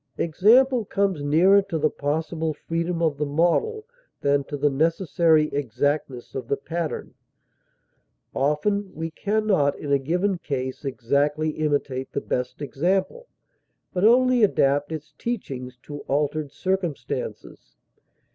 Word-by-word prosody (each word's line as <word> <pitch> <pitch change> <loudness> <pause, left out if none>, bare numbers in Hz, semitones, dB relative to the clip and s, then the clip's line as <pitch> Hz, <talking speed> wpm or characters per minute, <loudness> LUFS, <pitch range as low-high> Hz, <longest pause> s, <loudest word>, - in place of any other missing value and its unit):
Example 230 - +4
comes 195 -5 0
nearer 175 +8 +5
to 195 -4 -4
the 155 0 +1
possible 160 +2 -2
freedom 170 +2 -2
of 155 -3 +1
the 150 - +1
model 175 - +1 0.4
than 140 0 +2
to 145 - -5
the 145 +1 +2
necessary 160 +1 +2
exactness 140 0 -2
of 130 - -5
the 140 - 0
pattern; 170 -1 -4 1.2
often 185 +8 0
we 165 +1 -4
can 215 +6 -1
not, 145 -9 +2
in 145 - -5
a 140 - +4
given 180 +7 0
case, 130 -4 -4
exactly 140 +4 0
imitate 145 -4 -2
the - - 0
best 125 +2 -3
example, 190 - -1 0.7
but 180 - -1
only 250 +1 +5
adapt 145 -7 +2
its 155 -1 -7
teachings 130 - -4
to 145 -1 -7
altered 145 +1 -1
circumstances. 180 0 -4
155 Hz, 130 wpm, -24 LUFS, 145-190 Hz, 1.2 s, nearer